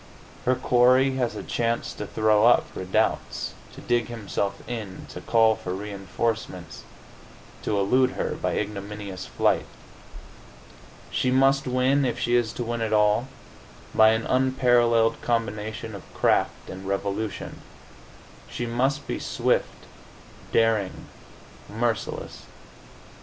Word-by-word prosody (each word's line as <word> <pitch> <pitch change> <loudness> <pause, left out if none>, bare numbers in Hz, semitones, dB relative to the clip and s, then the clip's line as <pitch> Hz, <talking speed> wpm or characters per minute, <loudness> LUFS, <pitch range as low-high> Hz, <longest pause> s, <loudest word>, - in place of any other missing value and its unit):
Her 130 - +3
quarry 125 +1 +4
has 125 -3 -1
a - - -5
chance 115 0 -1
to 105 - -6
throw 110 +1 +3
up 120 - +5
redoubts, 95 0 -1 0.2
to - - -10
dig 120 -1 +1
himself 100 -3 -4
in, 110 -6 -6
to - - -8
call 115 -1 +4
for 90 -2 -5
reinforcements, 100 -2 -4 0.8
to 105 - -1
elude 130 +6 +3
her - - -2
by - - -2
ignominious 100 -2 -5
flight. - - +1 1.4
She 130 - +1
must 135 +1 +3
win, 130 +3 +2
if 125 -3 0
she 120 - -1
is 120 -2 +2
to 120 - -3
win 120 0 -3
at 110 -1 -1
all, 105 +3 +3 0.7
by 110 0 +6
an 110 0 -1
unparalleled 120 -3 +3
combination 110 -2 -2
of 100 - -11
craft - - +1
and 95 +1 -8
resolution. 100 +1 -3 0.9
She 120 - -4
must 130 +4 0
be - - -3
swift, - - -1 0.7
daring, 110 -4 +1 0.6
merciless. 115 +1 -3
115 Hz, 120 wpm, -25 LUFS, 105-120 Hz, 1.4 s, by